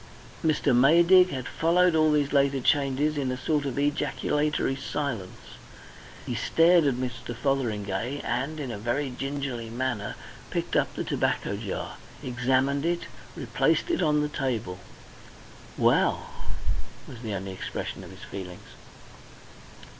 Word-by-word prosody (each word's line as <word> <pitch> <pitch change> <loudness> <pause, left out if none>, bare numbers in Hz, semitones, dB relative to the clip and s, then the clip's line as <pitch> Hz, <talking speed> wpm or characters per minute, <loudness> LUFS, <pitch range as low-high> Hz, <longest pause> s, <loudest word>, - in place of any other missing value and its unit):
Mr. 150 -4 +2
Maydig 170 +8 +6
had 130 -5 -4
followed 175 +2 +3
all 155 -1 +4
these 145 -1 +1
later 140 -1 +3
changes 145 +2 +2
in 130 -2 -1
a 130 - -3
sort 150 +1 0
of 130 - -4
ejaculatory 145 0 0
silence. 135 -8 -5 0.7
He - - -3
stared 170 0 +4
at 135 -3 +2
Mr. 120 -1 -4
Fotheringay 115 -2 -1
and 140 +6 -2
in 135 -4 -4
a 105 - -5
very 125 +5 -1
gingerly 135 -3 -4
manner 120 -3 -2 0.3
picked - - -2
up - - +1
the - - -2
tobacco - - 0
jar, - - -5 0.3
examined 130 +3 +1
it, 170 +1 0 0.3
replaced - - +1
it 340 - +1
on 150 -3 +3
the 150 - +1
table. 120 -10 -2 1.0
"Well!" - - +2 0.8
was 120 -3 -10
the 110 -4 -3
only 95 0 -4
expression 95 - -5
of - - -10
his - - -12
feelings. 90 -2 -8
135 Hz, 135 wpm, -27 LUFS, 120-150 Hz, 1.0 s, Maydig